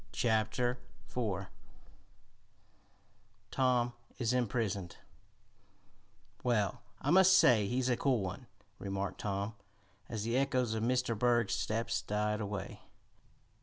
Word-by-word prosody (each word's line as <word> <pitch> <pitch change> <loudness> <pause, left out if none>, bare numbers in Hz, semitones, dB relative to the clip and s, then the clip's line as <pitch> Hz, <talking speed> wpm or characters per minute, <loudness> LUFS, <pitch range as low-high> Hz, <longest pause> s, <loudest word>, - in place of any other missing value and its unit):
Chapter 120 +2 +1 0.3
Four 100 -6 -3 2.0
Tom 125 -2 +2 0.2
is 120 -1 0
Imprisoned 110 -7 -1 1.5
"Well, 110 -6 +1 0.2
I 145 - 0
must 190 +1 +7
say 110 - +5
he's 125 +3 0
a 125 - +3
cool 125 -3 +1
one," 100 +7 -5 0.3
remarked 100 0 -3
Tom, 100 +1 -2 0.6
as 110 -3 -3
the 115 +3 0
echoes 130 -4 +1
of 110 - -2
Mr. 125 0 +1
Berg's 120 -1 +2
steps 115 +2 -1
died 105 +1 -1
away. 100 -1 -5
115 Hz, 105 wpm, -33 LUFS, 105-125 Hz, 2.0 s, must